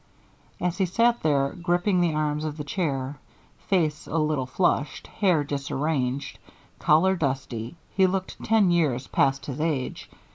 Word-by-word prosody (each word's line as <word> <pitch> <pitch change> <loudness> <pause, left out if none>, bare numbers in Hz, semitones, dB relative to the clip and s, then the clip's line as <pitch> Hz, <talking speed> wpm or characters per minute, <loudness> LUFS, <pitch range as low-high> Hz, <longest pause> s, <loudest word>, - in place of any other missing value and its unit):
As 180 +2 -1
he 190 - +2
sat 235 +6 +2
there 140 -3 +2
gripping 175 +3 +1
the 165 -3 +1
arms 150 0 0
of 155 -1 -4
the 150 - -4
chair, 140 -4 -2 0.5
face 160 -6 +1
a 165 - -2
little 150 -4 0
flushed, 150 -1 0
hair 180 -7 +1
disarranged, 140 -1 -2 0.4
collar 175 +5 +4
dusty, 130 -5 -3 0.2
he 190 -1 +4
looked 190 0 -3
ten 215 -5 +3
years 145 -7 +1
past 135 +1 +1
his 145 +1 -5
age. 150 -5 -2
155 Hz, 145 wpm, -25 LUFS, 140-180 Hz, 0.5 s, collar